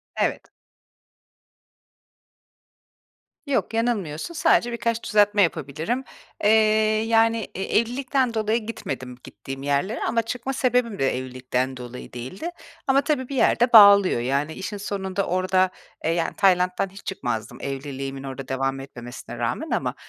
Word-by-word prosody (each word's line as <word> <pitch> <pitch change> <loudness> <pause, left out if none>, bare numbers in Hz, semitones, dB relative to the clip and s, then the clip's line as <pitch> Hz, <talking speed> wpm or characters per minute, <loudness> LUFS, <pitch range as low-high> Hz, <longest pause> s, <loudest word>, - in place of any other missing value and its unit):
Evet. - - -1 3.0
Yok, 280 -5 -1
yanılmıyorsun. 225 - -1
Sadece 240 -6 +3
birkaç 230 0 -1
düzeltme 205 0 +3
yapabilirim. 165 - -1 0.4
Eee, 210 - +5 0.6
yani, 225 -1 +3
e 190 - -3
evlilikten 250 +3 0
dolayı 220 0 0
gitmedim, 130 - -5
gittiğim 135 0 -8
yerlere. 145 +10 0
Ama 230 +1 +1
çıkma 250 +3 -4
sebebim 245 -4 +1
de 135 -2 +1
evlilikten 130 0 -3
dolayı 125 0 -9
değildi. 130 - -6 0.4
Ama 270 +1 +4
tabii 280 -3 -1
bir 280 - -4
yerde 245 -1 +3
bağlıyor. 200 - +8
Yani, 140 +5 -1
işin 205 +3 -5
sonunda 195 -1 -3
orada 185 +1 +2 0.3
e, 165 - 0
yani, 165 -1 -1
Tayland'dan 185 -1 +2
hiç 195 +1 -14
çıkmazdım, 120 - -4
evliliğimin 135 0 -5
orada 135 -1 -7
devam 135 0 -1
etmemesine 120 -3 -9
rağmen - - -2
ama, - - -1
190 Hz, 125 wpm, -24 LUFS, -, 3.0 s, bağlıyor